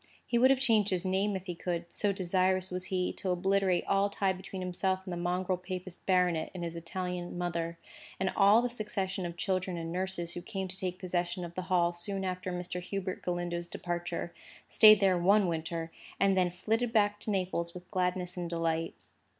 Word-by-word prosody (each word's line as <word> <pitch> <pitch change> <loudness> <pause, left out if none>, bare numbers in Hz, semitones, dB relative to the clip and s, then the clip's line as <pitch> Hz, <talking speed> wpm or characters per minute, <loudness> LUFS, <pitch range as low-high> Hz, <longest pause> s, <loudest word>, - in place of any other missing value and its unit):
He 235 - +1
would 260 +2 +6
have 270 -1 +4
changed 220 -5 +3
his 185 -1 -1
name 195 +2 +1
if 190 0 -5
he 180 - -3
could, 170 0 -4
so 205 - +1
desirous 185 0 +1
was 180 0 -2
he 185 -1 -1
to 190 - -4
obliterate 185 0 +2
all 195 +1 +2
tie 195 -1 +1
between 190 0 -7
himself 185 +1 0
and 185 - -4
the - - -3
mongrel 180 +1 0
papist 180 -1 -7
baronet 180 -4 +2
and 175 - -4
his 170 0 -4
Italian 175 +1 -4
mother, 170 -1 -2 0.4
and 190 0 +1
all 210 +4 +6
the - - +2
succession 200 -5 -3
of 170 0 -8
children 185 -2 -1
and 165 0 -4
nurses 180 -1 -2
who 175 - -5
came 190 0 -4
to 185 - -7
take 185 -1 -3
possession 180 -1 -2
of 170 - -9
the 185 - -3
Hall 175 -1 +3
soon 195 +3 -3
after 185 0 -3
Mr. 180 0 -3
Hubert 185 0 -4
Galindo's 175 -1 -2
departure, 175 0 -4 0.3
stayed 215 -2 +8
there 190 -2 +4
one 200 +3 +5
winter, 165 0 -3 0.3
and 195 -1 +4
then 180 -1 +3
flitted 220 +7 -1
back 205 -2 +3
to - - -4
Naples 180 -3 -1
with 180 0 -11
gladness 180 -1 0
and 175 -1 -3
delight. 165 -1 -1
185 Hz, 200 wpm, -31 LUFS, 175-195 Hz, 0.4 s, stayed